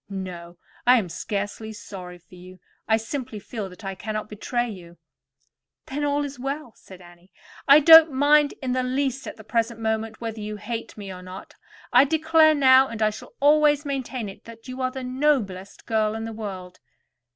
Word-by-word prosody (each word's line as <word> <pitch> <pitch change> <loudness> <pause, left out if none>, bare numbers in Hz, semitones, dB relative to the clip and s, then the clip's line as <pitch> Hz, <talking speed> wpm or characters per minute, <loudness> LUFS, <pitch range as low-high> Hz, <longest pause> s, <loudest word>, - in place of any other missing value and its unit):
No; 180 -3 -7 0.3
I 250 +1 +7
am 200 -7 -2
scarcely 205 +4 -4
sorry 185 -4 -9
for 175 +1 -25
you. 180 +1 -13 0.3
I 220 - +4
simply 235 0 -5
feel 205 -1 -6
that 180 +3 -13
I 195 - -3
cannot 215 +3 -5
betray 240 +3 -2
you." 175 -5 -10 0.9
"Then, 290 +2 -4
all 290 0 0
is 280 -2 -8
well," 275 -1 -5
said 185 -1 -15
Annie. 175 +1 -18 0.4
"I 285 +2 +8
don't 320 +1 +9
mind 290 +2 +3
in 255 - -1
the 255 0 +1
least 265 +1 -2
at - - -8
the 220 - -12
present 230 +1 -1
moment 220 0 -2
whether 225 -1 -5
you 210 0 -5
hate 225 +2 -6
me 200 -2 -7
or 180 - -10
not. 185 +1 -10 0.4
I 250 +3 +7
declare 315 +1 +4
now, 265 -1 +6
and 230 -3 -7
I 215 - +3
shall 210 - -11
always 295 0 +4
maintain 265 -4 -4
it, 195 - -11
that 230 +1 -13
you 255 +1 -6
are 255 - +1
the 260 0 -7
noblest 250 -8 -1
girl 215 -1 0
in 225 - -4
the 225 - -6
world." 190 -4 -7
225 Hz, 190 wpm, -24 LUFS, 200-270 Hz, 0.9 s, don't